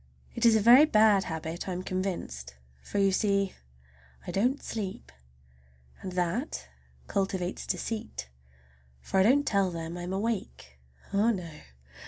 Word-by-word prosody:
It - - +3
is 225 - +6
a 220 - +3
very 245 +7 +8
bad 215 -7 +4
habit, 160 +2 -5
I - - -2
am 180 +1 -4
convinced, 170 - -4 0.3
for, 205 - -5
you 195 -1 +4
see, 200 0 +1 0.7
I - - -4
don't 250 +8 +1
sleep. 200 -4 -5 0.9
And 185 - -6
that 180 - -2 0.4
cultivates 190 -2 -2
deceit, 215 - -4 0.7
for 190 - -1
I - - +6
don't 275 +7 +4
tell 200 -6 +2
them 165 0 -5
I'm 175 +1 -5
awake,—oh, 190 - -3
no! 180 -7 -2
190 Hz, 135 wpm, -29 LUFS, 175-215 Hz, 0.9 s, very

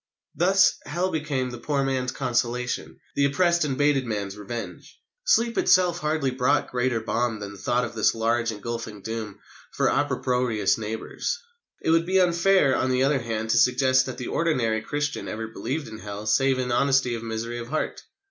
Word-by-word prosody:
Thus, 190 +3 +4
Hell 175 +5 -1
became 140 -5 -2
the 120 - -7
poor 140 +1 0
man's 130 -2 -1
consolation, 125 -1 -2 0.2
the 140 - +3
oppressed 170 +4 +2
and 135 -3 -1
baited 145 -3 +2
man's 100 -3 -3
revenge. 115 +3 -7 0.3
Sleep 235 - +3
itself 180 -2 +4
hardly 150 -4 0
brought 130 +3 +1
greater 125 -1 0
balm 115 0 -1
that 100 -1 -6
the 100 - -11
thought 120 +5 +1
of 120 - -7
this 110 0 +2
large 115 +1 +1
engulfing 110 -1 -6
doom 110 -2 -5 0.4
for - - +2
opprobrious 125 -7 +1
neighbours. 110 - -3 0.5
It - - +2
would 165 +1 +3
be 190 +1 +3
unfair, 175 -4 +4
on 130 - 0
the 130 0 +2
other 140 0 +2
hand, 110 -2 -3
to - - +3
suggest 130 0 +4
that 130 - -5
the 125 - -5
ordinary 120 -10 +1
Christian 145 +5 -3
ever 110 +1 -4
believed 135 +7 -4
in 110 -1 -9
Hell 105 0 -7
save 135 +4 +3
in 125 -1 -2
honest 135 +1 +3
misery 115 0 -4
of 120 - -6
heart. 155 +5 -3
125 Hz, 175 wpm, -25 LUFS, 115-145 Hz, 0.5 s, Thus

